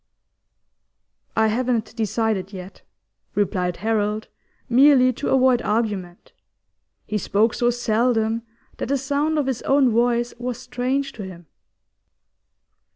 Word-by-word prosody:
'I 220 - +4
haven't 235 -1 -1
decided 220 -3 -1
yet,' 185 -1 -10 0.5
replied 180 -3 0
Harold, 215 -1 0 0.4
merely 255 0 +5
to 265 - -4
avoid 255 -2 +4
argument. 205 -5 -2 0.7
He 210 0 -2
spoke 215 +4 +1
so 240 - +1
seldom 230 -1 +1 0.4
that - - -3
the 280 - +1
sound 285 +4 0
of 295 - +1
his 260 -3 -2
own 270 -2 +3
voice 240 +1 +1
was 245 -1 -3
strange 260 +2 -2
to 220 - -8
him. 180 -2 -10
235 Hz, 115 wpm, -22 LUFS, 210-255 Hz, 0.7 s, merely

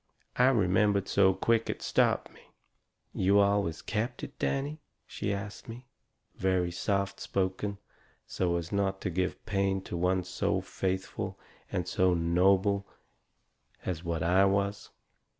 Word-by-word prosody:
I 125 - +5
remembered 100 -4 +3
so 95 -1 +4
quick 115 +3 +1
it - - -3
stopped - - +1
me. - - -18 0.7
"You 95 +2 +3
always 100 -5 +1
kept 115 +4 -2
it, - - -8
Danny?" 145 +3 -1 0.2
she 100 - -3
asts 100 +1 -5
me, 120 +2 -9 0.5
very 90 -2 +1
soft 100 +2 -1
spoken, 95 +2 -2 0.5
so 90 -2 -1
as 85 -1 -5
not 95 -1 0
to 95 - -2
give 90 +2 -2
pain 100 -2 +1
to - - -6
one 90 +1 +1
so 90 +1 -1
faithful 95 0 -3 0.3
and 90 -1 -2
so 90 0 +2
noble 95 +4 +2 1.0
as 90 -2 -3
what 85 -2 -2
I 90 +3 +4
was. 100 +1 0
95 Hz, 135 wpm, -30 LUFS, 90-100 Hz, 1.0 s, I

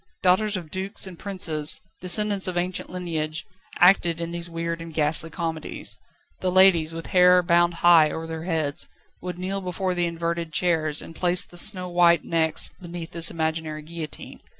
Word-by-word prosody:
Daughters 190 +3 +3
of 165 -4 -9
dukes 190 +3 -3
and 185 -3 -10
princes, 165 -7 +1 0.2
descendants 200 +1 +2
of 180 -1 -2
ancient 180 +1 -3
lineage, 165 -3 -4 0.3
acted 175 -2 +4
in 170 0 -4
these 170 0 -4
weird 165 0 -4
and 165 0 -8
ghastly 155 +1 +1
comedies. 165 -2 -4 0.4
The 185 - -1
ladies, 175 -4 +4
with 165 - -6
hair 180 0 +4
bound 175 0 +2
high 165 -3 +7
over 160 +2 -5
their 160 0 -6
heads, 160 -5 -2 0.3
would 180 0 -6
kneel 190 +2 -3
before 185 0 -3
the 175 -1 0
inverted 170 -1 -4
chairs, 160 -3 +1
and 165 - -11
place 180 +1 +2
the - - -17
snowwhite 175 -3 +2
necks 160 -1 +3
beneath 170 -1 -7
this 165 0 +3
imaginary 160 -1 -3
guillotine. 160 -1 -9
170 Hz, 165 wpm, -24 LUFS, 165-180 Hz, 0.4 s, high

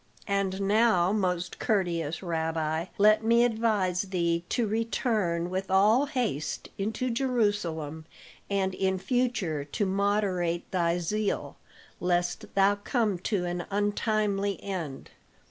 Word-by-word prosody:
And 200 -1 -1
now, 200 -3 +3
most 180 -4 -1
courteous 175 -7 0
rabbi, 160 -1 -1
let 215 +2 +5
me 235 +1 +4
advise 215 -6 +1
thee 170 -3 -1
to 240 - +1
return 215 -6 0
with 190 +1 -3
all 210 +9 +4
haste 240 - -2
into 220 +5 -2
Jerusalem, 205 - -1 0.4
and 195 -1 0
in 190 0 0
future 195 - -1
to 145 +8 -2
moderate 190 -3 0
thy 170 -2 +1
zeal, 205 +4 -2 0.4
lest 175 0 0
thou 200 +1 +4
come 210 -3 0
to 185 0 -1
an 175 0 -3
untimely 205 -1 0
end." 170 -9 -5
195 Hz, 115 wpm, -28 LUFS, 175-215 Hz, 0.4 s, let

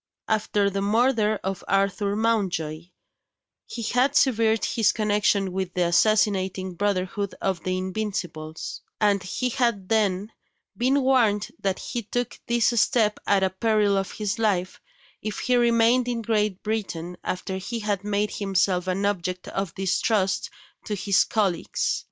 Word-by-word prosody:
After 210 -2 +1
the 195 +1 -2
murder 215 0 +2
of 190 -1 -3
Arthur 200 +1 +1
Mountjoy, 185 -8 -1 0.8
he 235 - -6
had 255 +5 +1
severed 225 -5 +3
his 220 -3 +2
connection 205 -2 +1
with 190 -1 -3
the 180 -1 +2
assassinating 190 0 +2
brotherhood 200 +1 -1
of 190 -3 -1
the 185 0 -1
Invincibles; 185 -5 -4 0.2
and 205 -2 +3
he 250 +8 -2
had 235 -6 0
then 210 -1 +1 0.4
been 265 +3 +2
warned 230 -6 +3
that 195 -1 -1
he 240 - -4
took 245 +3 -3
this 235 -1 +3
step 220 -5 +2
at 200 -1 +3
the 190 -1 +1
peril 210 0 +2
of 195 0 -2
his 210 +1 -3
life, 185 -5 0 0.4
if 215 0 -4
he 250 - +1
remained 235 +1 +3
in 235 -2 -2
Great 210 -3 0
Britain 180 -6 -3
after 190 +1 -3
he 230 +5 -4
had 205 -3 -2
made 210 0 0
himself 190 -2 0
an 190 +2 0
object 185 -2 -2
of 195 -3 -3
distrust 195 +1 0 0.4
to 210 - -2
his 200 0 +3
colleagues. 200 -6 0
205 Hz, 145 wpm, -25 LUFS, 190-225 Hz, 0.8 s, severed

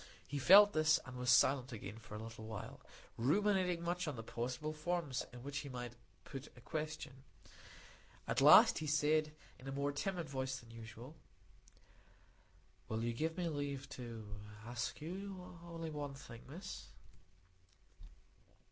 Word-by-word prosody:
He 145 - -3
felt 205 +8 +9
this, 155 0 +4
and 130 -2 -8
was 125 0 -1
silent 130 +1 +5
again 105 -1 -7
for 110 -1 -10
a 110 - -5
little 110 -1 -8
while, 110 -2 -7 0.4
ruminating 180 - +2
much 175 0 -1
on 150 - -2
the 115 - -6
possible 125 +7 -3
forms 155 -4 -2
in 125 -1 -10
which 140 +1 -3
he 140 - -6
might 120 -2 -5 0.3
put 135 0 -7
a - - -12
question. 150 -2 -5 1.0
At - - +1
last - - +9
he 155 - -3
said, 155 +1 +3 0.3
in 130 - -11
a - - -3
more 140 +1 0
timid 175 +3 -2
voice 130 -1 -2
than 115 -2 -15
usual,— 115 +5 -10 1.7
"Will 110 +1 -1
you 120 0 0
give 160 +7 -1
me 180 -1 0
leave 145 -3 -3
to 115 -5 -7 0.4
ask 120 +4 -3
you 180 +1 -6
only 165 -2 -5
one 145 -2 -4
thing, 120 -4 -10
Miss?" 185 +6 -7
140 Hz, 150 wpm, -37 LUFS, 125-160 Hz, 1.7 s, felt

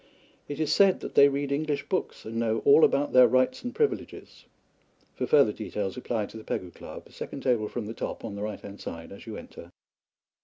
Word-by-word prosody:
It 145 +1 -6
is 155 -2 +1
said 195 -2 +5
that - - -6
they 140 - +7
read 140 0 -2
English 145 0 -1
books 185 - -3
and 115 +1 -5
know 115 -1 0
all 150 +3 +7
about 145 +1 +3
their 125 -1 +8
rights 130 - +1
and 245 - -3
privileges. 440 -2 -3 0.7
For - - -3
further 140 -8 +5
details 105 -3 -4
apply 115 -4 -2
to 110 - -11
the 110 - -9
Pegu 90 -4 -4
Club, - - -10
second 140 - -7
table 120 -5 +1
from 115 0 -5
the 110 - -5
top - - -5
on 110 - -5
the 100 - -6
right 105 0 -4
hand 100 0 -10
side 80 0 -7
as 100 - -12
you 110 - -6
enter. 85 - -11
120 Hz, 215 wpm, -27 LUFS, 105-145 Hz, 0.7 s, their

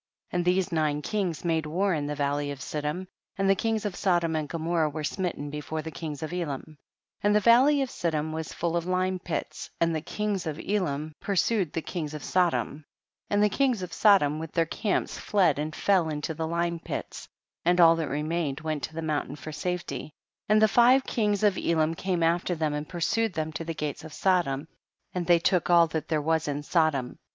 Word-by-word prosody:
4. - - -1
And 175 - 0
these 185 +1 +2
nine 150 -2 0
kings 185 -6 -2
made 160 -2 +1
war 185 +5 +1
in 145 -2 -1
the 150 - -3
valley 145 0 -1
of 140 -2 -5
Siddim; 150 +6 -3 0.3
and 195 0 +1
the 195 - +6
kings 220 +2 -1
of 200 -4 -2
Sodom 175 -4 +1
and 155 -2 -2
Gomorrah 165 -1 0
were 155 +1 -5
smitten 150 -4 -3
before 150 +1 -4
the 160 - -6
kings 155 -3 -6
of 155 - -5
Elam. 160 -7 -3
5. 155 - -15 0.5
And 205 0 +3
the - - +6
valley 260 +6 +5
of 260 - -5
Siddim 155 -2 -2
was 160 -1 -4
full 170 0 -2
of 170 0 -1
lime 185 0 0
pits 175 -2 -4
and 165 0 +2
the 155 - -1
kings 205 0 -2
of 155 0 -4
Elam 155 -7 -2
pursued 200 -3 +1
the 165 - -2
kings 155 -4 -4
of 150 - -7
Sodom, 175 -4 0 0.5
and 205 0 +3
the - - +6
kings 250 -5 +1
of 180 - -6
Sodom 155 -8 +4
with 160 0 -7
their 165 -1 +2
camps 205 +5 -2
fled 180 -8 +2
and 155 0 -3
fell 185 -5 +2
into 150 +1 -3
the 160 +1 -3
lime 170 0 -1
pits, - - -6 0.3
and 175 +1 +3
all 165 -1 +8
that 160 -4 -2
remained 150 0 -2
went 155 -2 -2
to 160 - -12
the 165 - -3
mountain 150 -2 -2
for 155 +1 -8
safety, 175 -1 -4 0.4
and 215 0 +5
the 220 - +6
five 245 +5 +5
kings 210 -5 0
of 205 -2 +3
Elam 160 -1 +1
came 180 0 -1
after 170 +2 +1
them 155 -2 -1
and 150 +1 -4
pursued 205 +5 0
them 160 -1 -2
to 165 - -4
the 165 0 -4
gates 150 -1 -4
of 160 -2 -10
Sodom, 165 -7 +1 0.5
and 180 -2 -3
they 175 -1 +6
took 175 +1 +1
all 170 -1 +7
that 160 -1 -4
there 155 -2 0
was 160 0 +1
in 145 0 -2
Sodom. 150 -6 +1
165 Hz, 215 wpm, -27 LUFS, 155-185 Hz, 0.5 s, all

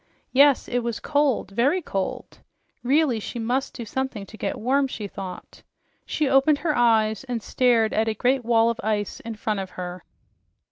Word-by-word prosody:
Yes, 280 0 +5
it 245 - 0
was 235 -2 -3
cold, 285 -9 0
very 260 - +2
cold! 195 - -4 0.4
Really, 270 -2 +2
she 225 - -6
MUST 245 +4 -1
do 235 - -6
something 250 -3 -3
to 215 - -13
get - - -3
warm, 270 +4 +2
she 215 -5 -6
thought. 190 -2 -9 0.5
She 305 - 0
opened 270 +3 +4
her 305 0 -1
eyes 220 -2 +3
and 240 -4 -4
stared 235 -3 +2
at 220 +1 +1
a 220 - 0
great 250 +4 +1
wall 230 0 +3
of 230 - -6
ice 210 -1 -1
in 230 -1 -7
front 210 -1 -2
of 190 -1 -5
her. 180 -1 -6
235 Hz, 180 wpm, -24 LUFS, 215-270 Hz, 0.5 s, Yes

